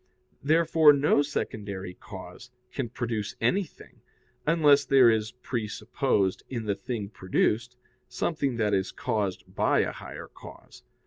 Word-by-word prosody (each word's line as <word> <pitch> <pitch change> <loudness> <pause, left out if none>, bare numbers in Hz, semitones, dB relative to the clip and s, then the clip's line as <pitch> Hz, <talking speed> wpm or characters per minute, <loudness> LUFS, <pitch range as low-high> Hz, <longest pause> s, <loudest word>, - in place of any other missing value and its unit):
Therefore 160 0 +5
no 145 0 +3
secondary 100 -9 -4
cause 95 +5 -11 0.2
can 130 -4 -3
produce 115 -4 -3
anything, 160 - -2 0.5
unless 150 -3 +5
there 130 -4 +6
is 110 -1 -1
presupposed 105 -3 -1
in 115 -4 -4
the 105 - +1
thing 105 +1 -5
produced 110 +4 -1 0.3
something 140 +1 -1
that 105 -3 +1
is 95 0 0
caused 105 -6 -2
by - - +2
a - - -1
higher - - -9
cause. - - -14
115 Hz, 125 wpm, -27 LUFS, 105-140 Hz, 0.5 s, there